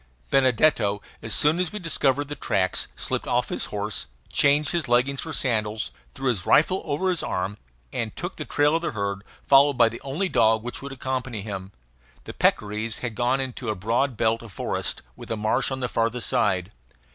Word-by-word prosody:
Benedetto, 130 -6 +3 0.2
as 115 - -6
soon 150 +9 +4
as 180 -3 0
we 210 - -5
discovered 145 -6 +1
the 145 - -4
tracks, 95 -9 0
slipped - - -2
off - - +1
his - - -1
horse, 65 - -3 0.3
changed 145 +1 +3
his 170 -3 -1
leggings 125 +3 +2
for - - -6
sandals, 110 -4 0 0.2
threw 135 -1 -1
his 105 -9 0
rifle 185 - +4
over 160 +5 0
his 175 - +1
arm, 95 +3 -3 0.3
and - - -3
took - - -5
the - - -3
trail 145 +2 +2
of - - -5
the 170 - -2
herd, 100 -2 -3 0.2
followed 140 0 +6
by 115 - +6
the 115 - -9
only 150 +8 -2
dog 110 -9 +3
which 120 - -5
would 140 0 -7
accompany 130 -5 -3
him. 95 -2 -6 0.5
The - - -8
peccaries 105 +1 0
had 120 -2 -3
gone 125 +4 +1
into 130 -3 -4
a 105 - 0
broad 115 +6 0
belt 115 +1 +1
of 115 -3 -11
forest, - - -3
with - - -11
a 115 - -2
marsh 110 +5 +1
on 130 -1 -4
the 125 - 0
farther 115 0 0
side. 90 -4 +1
125 Hz, 195 wpm, -25 LUFS, 110-140 Hz, 0.5 s, followed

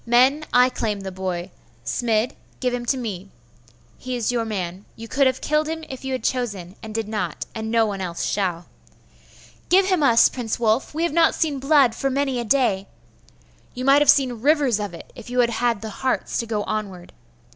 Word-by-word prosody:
Men, 260 +6 +3
I 250 +1 +5
claim 210 -5 -3
the 190 -1 -6
boy. 185 -1 -4 0.3
Smid, 230 0 0 0.3
give 250 -1 0
him 240 -1 -4
to 265 - +2
me. 200 -6 -5 0.7
He 255 0 -4
is 240 -1 0
your 235 -2 -1
man. 190 -3 -4
You 230 0 -9
could 275 +4 +3
have 260 0 -1
killed 305 0 +1
him 320 0 -4
if 265 0 -8
you 265 - -4
had 255 - -3
chosen, 205 -9 -2
and 220 -1 -8
did 225 -2 -2
not; 185 -7 -3
and 220 -1 -4
no 230 0 +3
one 200 -2 -3
else 175 -2 -4
shall.' 180 -4 -1 1.0
'Give 380 +2 +5
him 370 -4 +1
us, 235 -5 +6
Prince 240 -3 -4
Wulf! 230 +5 +1
We 325 - 0
have 340 - 0
not 335 0 +4
seen 300 -4 -1
blood 275 -3 +4
for 270 +3 -1
many 270 -1 0
a - - -2
day!' 220 -6 +1 0.9
'You 255 +1 -4
might 275 +2 +6
have 295 - +3
seen 250 -5 +4
rivers 280 -5 +3
of 205 -4 -4
it, - - -13
if 240 -1 -11
you 250 0 -1
had 235 -1 +2
had 235 -2 0
the 220 - -5
hearts 260 +5 -2
to 230 - -3
go 215 -2 -1
onward. 200 -5 -5
235 Hz, 210 wpm, -23 LUFS, 210-265 Hz, 1.0 s, us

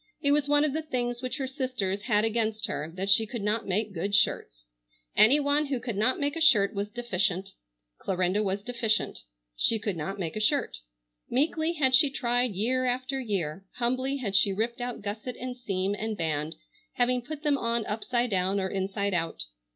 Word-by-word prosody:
It 285 - +1
was 290 -1 +2
one 290 0 +5
of 290 - -1
the 315 - -1
things 245 -5 -3
which 255 +1 -3
her 270 - -2
sisters 255 -8 -2
had 210 -1 +2
against 220 -1 0
her 155 -3 -4
that 190 +1 -3
she 215 +3 +5
could 230 -1 -5
not 210 +1 0
make 205 +2 -1
good 195 +4 -1
shirts. - - 0 0.5
Any 260 +8 +7
one 290 +1 +1
who 270 -3 -2
could 235 -3 -4
not 220 +6 +3
make 285 +1 -1
a 330 - -4
shirt 210 -11 +5
was 200 0 -3
deficient. 195 -4 -1 0.5
Clarinda 185 +2 0
was 200 -1 -2
deficient. 235 -2 0 0.4
She 225 - +3
could 205 -3 -3
not 190 +5 -4
make 170 -5 -4
a - - -2
shirt. 275 +6 +1 0.5
Meekly 315 +5 +1
had 270 -5 +2
she 290 +2 +7
tried 245 -3 0
year 255 +6 +1
after 255 +2 -1
year. 190 -8 -3
Humbly 255 +3 0
had 210 -7 -2
she 195 +1 +5
ripped 230 +5 -2
out 245 -3 -5
gusset 215 +4 -5
and 255 0 -5
seam 195 -5 -2
and 215 +1 -4
band, 155 -1 -2 0.4
having 250 0 +1
put 300 +4 -8
them 290 -3 +2
on 230 -1 0
upside 240 +2 -1
down 190 +1 +1
or 190 0 -2
inside 195 +1 -2
out. 165 - -1
225 Hz, 195 wpm, -27 LUFS, 195-255 Hz, 0.5 s, Any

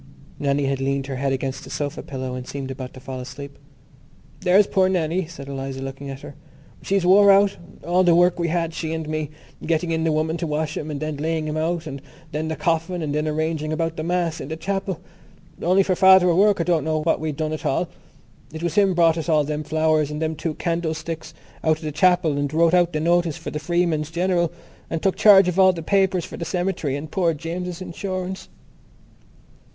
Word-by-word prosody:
Nannie 140 0 +1
had 135 -1 -1
leaned 135 0 -1
her 135 -1 -5
head 135 +1 0
against 135 +1 -3
the 135 - -11
sofa 145 0 -3
pillow 130 -2 -5
and 125 0 -6
seemed 135 -1 -5
about 130 -1 -7
to - - -9
fall 130 0 -7
asleep. 140 +2 -9 0.8
"There's 190 +3 +5
poor 190 -1 +2
Nannie," 175 -1 0
said 150 -5 -10
Eliza, 135 -1 -5
looking 135 +1 -7
at 135 0 -7
her, - - -9 0.5
"she's 195 -2 0
wore 200 +2 +7
out. 200 0 +4 0.3
All 180 +2 +3
the 175 -2 +5
work 175 0 +4
we 170 - +1
had, 165 0 -1
she 160 0 -3
and 160 -1 -4
me, 155 -1 -2 0.3
getting 165 +1 0
in 160 0 0
the 165 - +2
woman 155 +2 0
to 170 - -3
wash 155 0 -2
him 155 - -4
and 145 -2 -4
then 155 -1 -3
laying 160 +1 -1
him 150 - -3
out 165 +1 -1
and 140 -3 -7 0.3
then 155 +1 -2
the 160 - -2
coffin 170 0 -1
and 145 -2 -2
then 150 +1 0
arranging 155 0 -1
about 165 0 -1
the 155 - -4
Mass 170 -1 -1
in - - -6
the 160 +2 -5
chapel. 195 +1 -3 0.6
Only 185 +3 +4
for 190 - +1
Father 190 0 +7
O'Rourke 195 +2 +4
I - - +2
don't 170 -3 +1
know 155 -1 -1
what 165 - +1
we'd 155 -1 -2
have - - -13
done 155 -1 -2
at 155 - -5
all. - - 0 0.6
It 160 +1 -7
was 170 -2 -1
him 195 -2 +3
brought 165 -1 +4
us 165 - -4
all 155 -2 +4
them 150 +1 -3
flowers 155 -1 +1
and 150 0 -4
them 160 0 -1
two 155 0 -3
candlesticks 165 -1 -3 0.3
out 155 -1 +3
of 160 - -14
the 155 - -3
chapel 165 -1 +3
and 145 -1 -1
wrote 165 +2 +3
out 175 -1 +4
the 155 - 0
notice 170 -1 +1
for - - -7
the 150 - -3
Freeman's 165 -1 0
General 175 0 0 0.4
and 165 - -3
took 195 - +2
charge 195 -3 +7
of 180 +1 0
all 190 -1 +6
the 165 -2 -6
papers 190 -1 +2
for - - -9
the - - -4
cemetery 170 -4 -1
and 150 +2 -6
poor 170 -4 +1
James's 175 +3 -5
insurance." 185 +1 -5
160 Hz, 225 wpm, -23 LUFS, 150-175 Hz, 0.8 s, wore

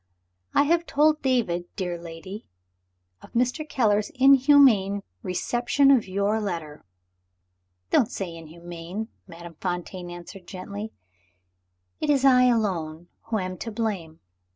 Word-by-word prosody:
"I - - +6
have 335 +3 +1
told 305 +1 +3
David, 230 -10 0
dear 180 -2 -3
lady, 170 +4 -9 0.7
of - - -16
Mr. 250 +6 0
Keller's 210 -4 +2
inhuman 265 -7 +5 0.2
reception 240 +9 +2
of 255 -7 +3
your 200 +3 0
letter." 165 -7 -5 1.1
"Don't 225 - +4
say 180 -4 -5
'inhuman,'" 170 +5 -8 0.2
Madame 170 -2 -11
Fontaine 180 0 -4
answered 175 +1 -10
gently; 200 +3 -7 1.1
"it 305 - -2
is 275 -2 +3
I 250 -2 +6
alone 175 -9 0 0.2
who 225 -1 -1
am 185 -2 -4
to 230 - -5
blame. 200 -8 -3
200 Hz, 120 wpm, -25 LUFS, 175-250 Hz, 1.1 s, I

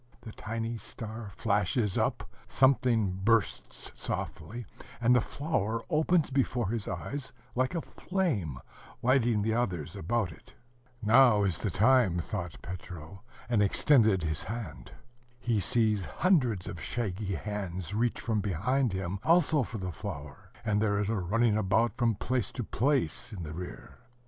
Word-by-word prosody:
The 115 -1 -9
tiny 115 +2 -4
star 110 +1 -7
flashes 105 +1 +1
up, - - 0 0.2
something 120 -8 +3
bursts 115 -1 0
softly, 110 +10 -4 0.3
and 120 +1 +4
the 125 - +5
flower 115 -7 -2
opens 160 0 +2
before 125 -5 +1
his 115 -2 -2
eyes 140 -2 -4 0.2
like 130 +6 0
a 165 - -1
flame, 135 - -2 0.5
lighting 120 -4 +3
the 110 +1 +1
others 95 -11 -1
about 100 +2 -1
it. - - -16 0.5
"Now 115 -1 +6
is 95 -4 0
the 105 - -1
time," 110 -1 +4
thought 85 0 -4
Petro, 90 0 -8 0.3
and 115 -3 +2
extended 105 - +4
his 80 -2 -1
hand. 110 -7 -6 0.5
He 115 -3 +1
sees 105 -1 +2
hundreds 125 - +1
of 85 - -6
shaggy 100 -4 -2
hands 95 -2 -4
reach 115 +3 0
from 110 -3 0
behind 110 - 0
him, 95 0 -3
also 160 -3 +4
for 115 -1 -4
the 95 -2 -4
flower; 80 -8 -8 0.2
and 105 -1 +2
there 105 -2 +2
is 105 0 0
a 115 - +1
running 105 +5 +2
about 110 +2 +2
from 120 -3 +2
place 125 +4 -1
to 125 - -3
place, 125 0 0
in 95 -5 -6
the 80 -1 -6
rear. 90 +2 -8
110 Hz, 150 wpm, -30 LUFS, 95-120 Hz, 0.5 s, Now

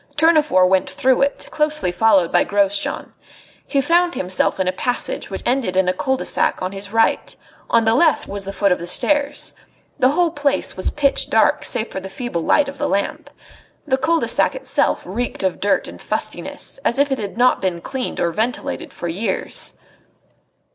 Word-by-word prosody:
Tournefort 305 - +4
went 190 0 +1
through 260 0 +1
it, 280 +1 -1
closely 300 - 0
followed 190 -2 +3
by 175 - +4
Grosjean. 200 0 0 0.5
He 275 - +1
found 345 +4 +2
himself 185 +1 0
in 190 - 0
a - - +2
passage 245 +6 -2
which 195 - -6
ended 240 -8 0
in 190 -1 +3
a 180 - +2
cul 265 +8 -1
de - - -5
sac - - +1
on 185 - -2
his 200 0 -6
right; 225 0 +1 0.3
on 230 -1 +3
the 225 - +3
left 310 +5 +2
was 200 0 -3
the 195 - -5
foot 200 0 +1
of 180 - +1
the 170 - -7
stairs. 290 +8 +1 0.5
The 255 - +4
whole 335 +3 +1
place 290 -3 -1
was 185 - -1
pitch 285 -2 +1
dark - - +3
save 220 - 0
for - - -4
the 190 0 -8
feeble 190 -3 -4
light 290 - +2
of 275 0 -8
the - - -1
lamp. 285 +10 -2 0.6
The 265 -3 0
cul 330 +5 +2
de - - -2
sac - - +3
itself - - 0
reeked 220 +4 -3
of 190 -2 -1
dirt 200 0 +1
and - - -11
fustiness, - - -3
as 240 - -1
if 280 0 +2
it 265 - -1
had 205 0 -6
not 250 +1 +3
been 180 -3 -1
cleaned 260 +8 -4
or 170 - +1
ventilated 250 - -3
for 175 - -6
years. 185 +7 -1
230 Hz, 195 wpm, -20 LUFS, 190-285 Hz, 0.6 s, Tournefort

